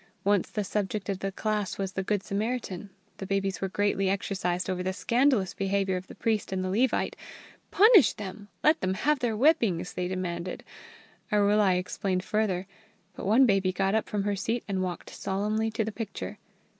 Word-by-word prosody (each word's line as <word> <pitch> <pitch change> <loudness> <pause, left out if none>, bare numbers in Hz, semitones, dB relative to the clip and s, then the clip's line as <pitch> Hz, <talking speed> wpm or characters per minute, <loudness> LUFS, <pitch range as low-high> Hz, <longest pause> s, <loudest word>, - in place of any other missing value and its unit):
Once 200 -2 +2
the 210 - -2
subject 200 0 -2
of 195 -2 -1
the 195 0 -2
class 210 -1 -2
was 195 -1 -2
the 190 - -2
Good 200 0 -1
Samaritan. 210 -2 -3 0.3
The 195 - -6
babies 195 -1 -1
were 195 - -1
greatly 195 -1 +1
exercised 185 -2 -1
over 185 -1 -2
the 185 +1 -1
scandalous 235 -2 +2
behaviour 195 -1 0
of 185 0 -5
the - - -11
priest 220 -3 -1
and 185 -1 -1
the 185 - -2
Levite. 235 +5 +1 0.5
"Punish 415 - +7
them! 205 0 -8 0.2
Let 310 +1 +4
them 185 0 0
have 295 +8 +1
whippings!" 225 - +2
they 180 -1 -2
demanded. 180 -1 -4 0.7
Arulai 205 -2 +4
explained 185 0 -2
further. 200 -4 0 0.5
But - - -5
one 235 +6 +6
baby 195 -4 +2
got 195 +1 0
up 220 - 0
from 205 -1 -1
her 205 0 0
seat 225 +5 -2
and 195 -2 -1
walked 180 -2 -4
solemnly 210 +3 -1
to 220 0 -1
the 220 - -3
picture. 205 - -6
195 Hz, 180 wpm, -28 LUFS, 185-215 Hz, 0.7 s, Punish